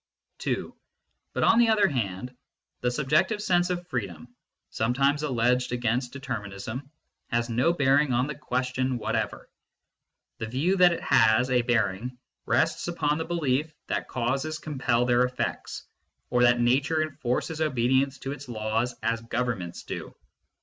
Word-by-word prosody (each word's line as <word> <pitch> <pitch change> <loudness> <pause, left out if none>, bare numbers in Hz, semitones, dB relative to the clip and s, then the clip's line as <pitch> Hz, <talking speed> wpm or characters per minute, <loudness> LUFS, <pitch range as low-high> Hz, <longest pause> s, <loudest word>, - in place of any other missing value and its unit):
(2) - - -3 0.6
But, - - 0
on 230 - +5
the 235 -1 +5
other 215 -2 +4
hand, 125 -1 -3 0.4
the 125 - +1
subjective 150 - +1
sense 175 -3 +2
oi 180 - +1
freedom, 120 - -5 0.4
sometimes 135 +6 +1
alleged 125 -3 +1
against 120 +1 0
determinism, 125 -1 -6 0.4
has 120 -1 -1
no 125 +9 +3
bearing 145 -3 +3
on 125 +1 +2
the 150 - -4
question 130 -2 -1
whatever. 115 - -2 0.9
The 110 - -3
view 145 - +1
that 180 -1 +7
it - - -5
has 115 +3 +4
a 125 -1 +4
bearing 120 0 0 0.3
rests - - +1
upon 150 -3 0
the 160 - -2
belief 155 -2 0 0.2
that - - -1
causes 135 +6 -1
compel 130 -6 0
their 125 0 +3
effects, 125 0 -2 0.5
or 125 0 +3
that 120 0 +5
nature 135 +6 +2
enforces 155 +1 -2
obedience 130 -1 +2
to 135 - -4
its 145 -2 -8
laws 115 +2 -1
as 115 +1 0
governments 115 -7 -3
do. - - -7
125 Hz, 145 wpm, -27 LUFS, 120-150 Hz, 0.9 s, that